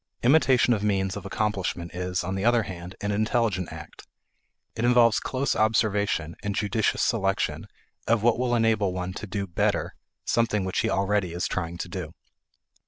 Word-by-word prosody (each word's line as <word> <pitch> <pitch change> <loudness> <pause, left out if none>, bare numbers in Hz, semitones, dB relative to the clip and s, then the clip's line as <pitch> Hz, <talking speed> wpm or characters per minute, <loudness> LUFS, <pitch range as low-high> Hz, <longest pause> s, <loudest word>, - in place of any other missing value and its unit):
Imitation 130 -2 +4
of 105 - -1
means 95 -2 0
of 100 -2 -6
accomplishment 95 -5 -2
is, 90 +1 -2
on 95 - -3
the 95 0 -2
other 120 0 +4
hand, 90 -1 -8
an 105 0 -1
intelligent 110 -3 0
act. - - -11 0.7
It 115 - -3
involves 120 -2 +5
close 135 +1 -1
observation, 105 -6 +1
and 100 -1 -3
judicious 110 0 0
selection 95 -4 0 0.4
of 115 -2 +2
what 120 0 +3
will 125 -1 +1
enable 110 -4 +2
one 90 0 -3
to 105 +2 -7
do 100 +1 -3
better 85 -3 -1 0.3
something 110 -4 +1
which 95 - -1
he - - +1
already 95 -2 0
is 90 +1 -1
trying 85 -2 -3
to 85 - -5
do. 85 -2 -6
100 Hz, 170 wpm, -26 LUFS, 95-115 Hz, 0.7 s, involves